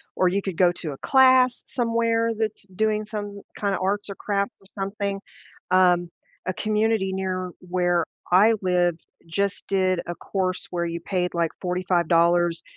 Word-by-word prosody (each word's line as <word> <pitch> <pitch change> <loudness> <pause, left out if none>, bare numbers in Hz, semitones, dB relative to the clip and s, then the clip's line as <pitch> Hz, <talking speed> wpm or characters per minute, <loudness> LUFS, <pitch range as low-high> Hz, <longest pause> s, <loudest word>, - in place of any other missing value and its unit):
or 185 - +3
you 200 +2 0
could 190 -4 -4
go 180 -2 +5
to 155 -4 -5
a - - -10
class 260 -2 +5
somewhere 230 -1 +1
that's 215 -2 -2
doing 215 +3 0
some 205 -1 -6 0.2
kinda 200 -2 0
arts 200 +2 -1
or 200 - -5
crafts 200 -1 -1
or 195 - -21
something, 195 0 -2 0.5
um, 180 -2 +4 0.4
a 185 - -1
community 215 -2 0
near 185 -1 -2 0.2
where 175 -1 +1 0.3
I 210 +5 +6
live 175 -2 +2 0.3
just 200 +4 -2
did 185 -2 +1
a 175 - -4
course 185 -2 -2
where 170 -1 -1
you 170 0 -3
paid 180 -1 -1
like 170 -1 0
$45 175 -1 +2
190 Hz, 155 wpm, -24 LUFS, 175-210 Hz, 0.5 s, I